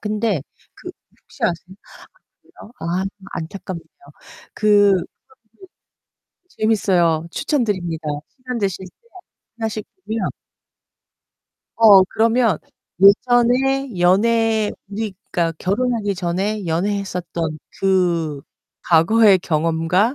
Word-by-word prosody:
근데 210 -6 -1 0.3
그 - - -9 0.3
혹시 - - -17
아세요? 175 +2 -3
아 - - -18 0.5
그래요? 220 - -16
아 175 +3 -2 0.3
안타깝네요. 170 +1 -6 0.7
그 205 -1 +4
프로그램이 185 -2 +1 1.5
재밌어요. 180 - +1
추천드립니다. 185 - -2 0.2
시간 255 -2 -7
되실 195 -3 -2
때 465 - -24 0.5
하나씩 220 -1 -3 0.2
보면 220 0 -2 1.5
어 205 -4 +8
그러면 225 -1 +1 0.4
예전에 245 +3 +3
연애 220 +4 +2 0.2
우리 210 0 -4 0.2
그러니까 170 -2 0
결혼하기 210 +1 -1
전에 190 +4 -2
연애했었던 170 -3 -2 0.2
그 170 -6 +1 0.4
과거의 195 +5 +5
경험과 165 - 0
200 Hz, 230 characters per minute, -20 LUFS, 175-225 Hz, 1.5 s, 어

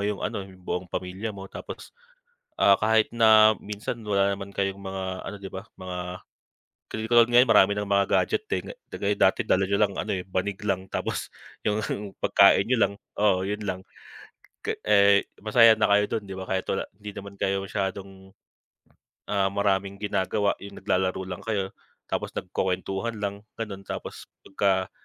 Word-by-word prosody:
yung 105 -1 -3
ano - - -2
yung 95 -1 -11
buong 90 0 -3
pamilya 95 +4 -4
mo. 95 - -7
Tapos, - - -9 0.7
ah, 100 - +6
kahit 110 +1 +3
na 110 -1 +7
minsan 105 +3 -5
wala 100 -1 +2
naman 100 0 -8
kayong 100 0 -2
mga 95 0 -5 0.2
ano - - -6
'di 100 - -8
ba 95 0 -7 0.2
mga, 90 -1 -6 1.0
'di 110 0 -3
katulad 120 -1 +6
ngayon 125 +2 +6
marami 100 -3 +6
ng 105 - -3
mga 100 0 +3
gadget, 435 0 +2
eh, - - -1
'di - - -8 0.2
kagaya 100 0 -1
dati 100 +4 +2
dala 95 - +3
niyo 100 +1 0
lang 100 -2 +2
ano, 105 - -3
eh, 95 -2 -3
banig 95 +2 -2
lang 95 -1 -2
tapos - - -3 0.3
yung 105 0 +1 0.4
pagkain 100 +1 +5
niyo 125 - +2
lang, 100 - +1 0.2
oo 95 -2 +2
yun 105 +1 -3
lang. 95 -2 -3 1.0
Eh, 100 -1 +5 0.2
masaya 110 +1 +6
na 110 - +4
kayo 105 0 +3
dun 110 -3 -2
'di 95 - -7
ba 95 - -6
kahit 95 0 -2
wala, 95 - -1 0.2
hindi 105 0 -7
naman 100 -1 -8
kayo 95 0 0
masyadong, 95 0 -5 1.0
ah, 100 -1 +2
maraming 100 0 0
ginagawa, 100 0 +1
yung 100 0 -9
naglalaro 95 -1 0
lang 90 -1 -6
kayo 100 -4 -1 0.4
tapos - - -2
nagkukuwentuhan 95 +5 -2
lang 100 0 -1 0.2
ganon. 100 -4 -6
Tapos - - -7 0.2
pagka 95 -1 +1
100 Hz, 170 wpm, -26 LUFS, 95-105 Hz, 1.0 s, na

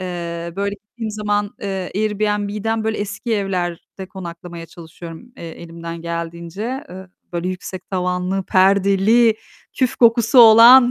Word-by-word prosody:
Eee, 170 -2 -5
böyle 200 0 -1
gittiğim 215 +2 -8
zaman, 205 -1 -1
eee, 195 -2 -4
Airbnb'den 210 +1 -1
böyle 220 0 -1
eski 205 +3 -3
evlerde 190 -2 -4
konaklamaya 170 -2 -9
çalışıyorum 170 +7 -12
e 170 - -8
elimden 165 0 -8
geldiğince. 170 - -5
Eee, 190 +1 -10 0.3
böyle 175 +1 -2
yüksek 185 0 -7
tavanlı, 180 +1 -1
perdeli, 200 +5 +3 0.4
küf 260 -1 -1
kokusu 235 +1 +4
olan. 240 +2 +9
195 Hz, 120 wpm, -19 LUFS, 175-215 Hz, 0.4 s, olan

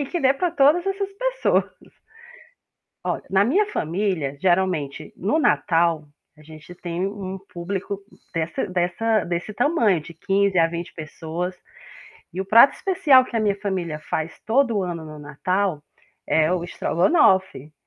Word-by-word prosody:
e 285 - -2
que 345 - -3
dê 265 0 +4
para 350 +6 -1
todas 315 +2 +3
essas 390 0 -2
pessoas. - - +1 1.4
Olha, - - -2
na 195 +1 +3
minha 380 - +2
família, 165 - -2
geralmente 175 -6 0
no 210 - 0
Natal, 165 - +2 0.3
a - - -16
gente 155 +3 -13
tem 175 +1 -3
um 195 -1 -5
público 195 +3 -4 0.3
dessa 165 0 -2
dessa 185 +4 0
desse 175 +4 -3
tamanho, 230 - +2
de 170 +3 -12
15 195 +2 +1
a 165 - +5
20 170 +1 -6
pessoas 165 +3 -5 0.8
e 180 - -4
o - - -2
prato 230 +7 +7
especial 295 -9 +4
que 245 - -13
a - - +1
minha 205 -2 +1
família 180 -6 -3
faz 160 +1 -3
todo 230 -4 +2
ano 170 -2 -5
no 155 -1 -10
Natal, 160 +3 -2 0.4
é 160 +2 +2
o 180 -2 -1
estrogonofe. 180 - +1
185 Hz, 150 wpm, -23 LUFS, 165-225 Hz, 1.4 s, prato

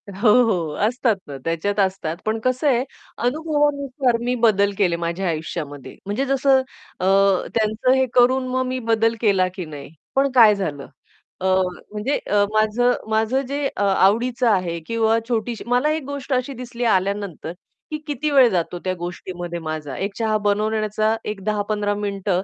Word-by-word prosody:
अ, - - -8
हो, 220 +1 +4
हो, 175 -9 0
असतात 240 -1 +1
ना, 140 -1 -7
त्याच्यात 170 +5 -1
असतात. 190 -4 0
पण 220 +1 0
कसं 255 +3 +1
आहे? 250 -3 +3 0.4
अनुभवानुसार 285 -3 0
मी 250 - +1
बदल 200 -2 +3
केले 180 -4 +2
माझ्या 170 +3 -2
आयुष्यामध्ये 155 -3 -5
म्हणजे 205 +7 -1
जसं 270 0 +3 0.4
अ, - - -1 0.5
त्यांचं 220 +2 +1
हे 265 0 +3
करून 255 +1 +4
मग 255 0 0
मी 255 0 -2
बदल 225 0 +3
केला 195 -5 +3
की 185 -3 -5
नाही? 145 -2 -9 0.2
पण 275 +1 +3
काय 220 -4 +7
झालं? 150 -8 -4 0.5
अ, - - -2 0.5
म्हणजे 215 +7 -1
अ, 205 0 +4
माझं 220 +3 +2 0.2
माझं 220 +4 +1
जे 285 +2 -2
अ, - - -1
आवडीचं 225 +6 +2
आहे 180 -5 0
किंवा 225 0 +2
छोटीशी 230 -1 -2
मला 245 +5 +2
एक 315 -1 -2
गोष्ट 280 0 -4
अशी 255 +2 -1
दिसली 245 -1 -6
आल्यानंतर, 195 -4 -4 0.4
की 305 - -2
किती 300 +1 -2
वेळ 270 -3 +7
जातो 175 -2 -2
त्या 185 - -1
गोष्टीमध्ये 175 0 -6
माझा 155 -4 -5
एक 200 +1 -3
चहा 220 -2 +1
बनवून 210 +1 +1
येण्याचा 215 0 0
एक 210 -2 -5
10-15 205 0 -1
मिनिट 200 -1 -4
215 Hz, 165 wpm, -21 LUFS, 190-250 Hz, 0.5 s, काय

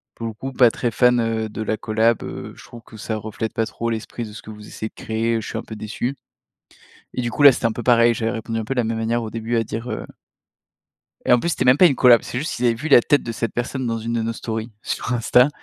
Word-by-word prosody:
«Pour 115 - -5
le 110 - -5
coup 135 +5 -6
pas 125 -3 +5
très 120 +1 -2
fan, 125 +1 +4
heu, 115 -1 -1
de 110 - -6
la 110 0 -1
collaboration, 110 +2 +1
heu, - - -7
je - - -14
trouve 120 - -12
que 110 - -13
ça 110 +1 -4
reflète 110 +1 -5
pas 115 - 0
trop 115 +1 -4
l'esprit 115 +1 -4
de 105 - -10
ce - - -9
que - - -13
vous 105 -1 -11
essayez 110 - -6
de - - -41
créer, 115 +1 -1
je - - -8
suis - - -4
un 115 - -4
peu 110 - -9
déçu.» 110 +5 -4 1.0
et 125 - -2
du 120 - -2
coup, 145 - -1
là 140 -1 +10
c'était 120 - -1
un 115 - 0
peu 120 - -6
pareil, 120 0 +5
j'avais 115 0 -1
répondu 115 -1 -4
un 110 - -3
peu 135 +5 -3
de 125 - +2
la - - -1
même 110 0 -2
manière 115 +1 0
au 110 - -5
début 115 +2 -2
à 115 - +2
dire, 115 +3 -5
heu - - -4 1.2
et - - +4
en 125 - +6
plus 170 - -1
c'était 140 - -1
même 125 +1 +6
pas 180 +4 +7
une 140 - +3
collaboration, 120 -3 +6
c'est 125 - -4
juste 150 - -3
qu'ils 125 - 0
avaient 115 - +3
vu 140 +8 -5
la 140 - +8
tête 145 +4 +2
de 115 - -5
cette 115 0 -3
personne 125 +1 -2
dans 115 -1 -1
une 115 +1 -4
de 115 - 0
nos 115 +1 -2
stories 110 0 -5
sur 120 - -3
Insta, 125 +2 +4
115 Hz, 295 wpm, -21 LUFS, 110-120 Hz, 1.2 s, là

